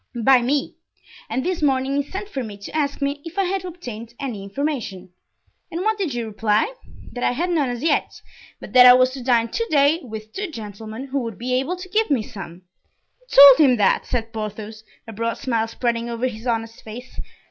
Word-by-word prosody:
"By 260 +1 +6
me; 275 +4 -1 0.5
and 255 +4 -2
this 365 -2 -1
morning 270 -1 +1
he 285 - +2
sent 395 +2 -5
for 270 -10 -4
me 210 -3 -8
to 200 +8 -9
ask 285 -2 -1
me 285 +1 -2
if 335 +3 -10
I 395 - +3
had 380 0 -2
obtained 240 -11 -8
any 245 -8 -4
information." 200 - -4 0.6
"And 340 0 -4
what 435 +1 0
did 335 -10 -2
you 235 -1 -2
reply?" 215 - 0 0.4
"That 245 - -5
I - - +2
had 345 +7 -1
none 295 -6 +1
as 245 +2 -4
yet; 315 -2 0 0.4
but - - -11
that 250 -1 +9
I 250 - +10
was 255 0 +4
to 260 -1 -7
dine 235 -2 +2
to 460 - -2
day 290 +2 +4
with 220 -3 -9
two 410 -1 -4
gentlemen, 220 0 -8
who 275 +1 -1
would 230 -5 -5
be 250 +2 -3
able 270 +8 0
to 365 +1 -9
give 430 +4 +1
me 265 -7 +1
some." 185 -4 -10 0.6
"You - - -31 0.3
told 295 -3 +6
him 250 - +3
that?" 200 -3 +2
said 230 -2 -3
Porthos, 215 0 -6 0.2
a 225 - -8
broad 230 +2 -2
smile 230 -4 -1
spreading 235 0 -2
over 235 +1 -2
his 235 -1 -4
honest 225 -1 -2
face. 235 +4 -10
250 Hz, 215 wpm, -22 LUFS, 225-295 Hz, 0.6 s, I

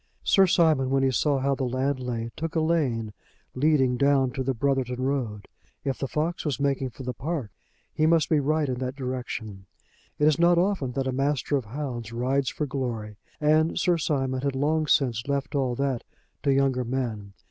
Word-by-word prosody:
Sir 195 -1 +5
Simon, 160 -7 +3
when 135 0 +2
he 135 - +3
saw 140 +2 +2
how 135 +1 +1
the 135 - -2
land 130 +2 0
lay, 115 -2 -4
took 165 0 -4
a - - +3
lane 135 -10 0 0.4
leading 130 -3 +2
down 140 -2 +3
to 130 - -4
the 130 0 -1
Brotherton 130 0 0
road. 120 -7 -2 0.4
If 135 -2 -2
the 135 - -2
fox 160 +5 -2
was 145 -3 -2
making 140 -2 0
for 130 +3 -10
the 125 0 -3
park 135 -1 -4 0.4
he 155 - +2
must 165 -1 +4
be 155 - +3
right 150 +1 +1
in 125 -2 -2
that 130 0 -3
direction. 120 -7 -5 0.5
It 150 - +3
is 155 +1 +3
not 170 0 +5
often 175 -8 +1
that 135 +1 -1
a 130 - 0
master 140 +2 0
of 135 -4 -1
hounds 120 -2 -5
rides 130 +3 0
for 150 - -3
glory, 120 -6 -4 0.2
and 155 +2 +3
Sir 175 -2 +2
Simon 135 -4 -1
had 140 -1 -1
long 155 +3 +1
since 120 -5 +2
left 140 0 -2
all 130 -4 0
that 135 -2 -1 0.4
to 140 - +2
younger 135 -2 +2
men. 115 -5 -3
135 Hz, 195 wpm, -26 LUFS, 125-150 Hz, 0.5 s, Sir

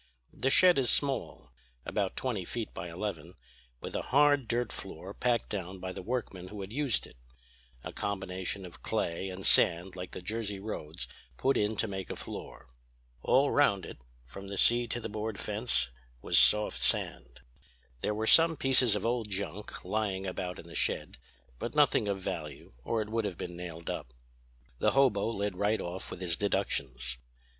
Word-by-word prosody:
The 135 - 0
shed 180 +2 +6
is 125 - +2
small, 140 - -1 0.3
about 100 -2 -1
twenty 120 -8 -1
feet 115 +5 -5
by 85 +1 -5
eleven, 85 -2 -5 0.5
with - - -6
a - - 0
hard 145 -2 +4
dirt 120 +1 0
floor - - -6
packed 120 -2 0
down 95 -2 -4
by 95 0 -5
the - - -6
workmen 95 -4 -3
who 105 +1 -7
had 95 +3 -7
used 140 -5 +1
it; - - -16 0.7
a - - -6
combination 95 -1 -3
of 90 - -12
clay 85 +3 -1
and 95 +1 -6
sand 90 +2 +4
like 90 -1 -6
the - - -7
Jersey 105 0 -3
roads 80 - -5 0.3
put 135 - +2
in 105 +1 +1
to 115 - +1
make 95 -2 -5
a - - -3
floor. - - -8 0.6
All 140 - +4
round 100 -10 +3
it, - - -9 0.3
from 95 +10 -9
the 100 0 -5
sea 120 +3 +5
to 120 - -1
the 115 - -4
board 110 0 -4
fence, 105 - 0 0.3
was - - 0
soft 105 -13 +6
sand. 65 0 0 0.6
There 105 - -1
were 110 +1 -1
some 165 +6 +7
pieces 130 -5 +4
of 105 - -2
old 115 -2 0
junk 100 0 -5
lying 100 -3 -1
about 90 -1 -3
in - - -10
the 85 - -12
shed; - - -1 0.4
but - - -4
nothing 105 - +4
of 100 -1 -1
value 80 -5 -5
or 110 - 0
it 105 - -11
would 115 0 0
have 95 -4 -3
been 90 -1 -5
nailed 85 -1 -5
up. - - -6 0.6
"The - - +3
hobo 125 -7 +4
led 100 -4 -2
right 105 +3 +2
off 90 +2 -5
with 95 - -7
his 85 -2 0
deductions. 65 -11 -2
100 Hz, 180 wpm, -31 LUFS, 90-115 Hz, 0.7 s, some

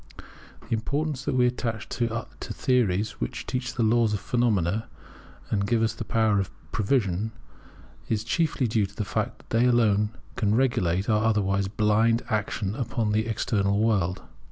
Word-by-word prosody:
The - - -2
importance 140 +4 -2
that - - 0
we 125 -1 +4
attach 115 -3 -2
to 115 -2 -1 0.2
theories 105 -4 0
which - - -3
teach 125 0 -3
the 120 - +1
laws 110 -1 +3
of - - -3
phenomena, 110 -4 0 0.6
and 100 -2 +1
give 115 0 +2
us 110 -1 +1
the - - -5
power 110 -3 +2
of 95 - -1 0.2
prevision, 110 -2 0 0.8
is 110 -1 0
chiefly 145 +2 0
due 110 -3 +1
to 100 - -19
the 105 - -2
fact - - -2
that - - -22
they 125 - +5
alone 105 -4 +3 0.3
can 105 0 +2
regulate 95 -7 +1
our 110 -1 +2
otherwise 100 -3 +1
blind 110 +3 +2
action 105 -2 -1
upon 115 -3 -1
the 110 +1 +1
external 100 -3 0
world. 100 -5 +1
110 Hz, 160 wpm, -26 LUFS, 100-120 Hz, 0.8 s, they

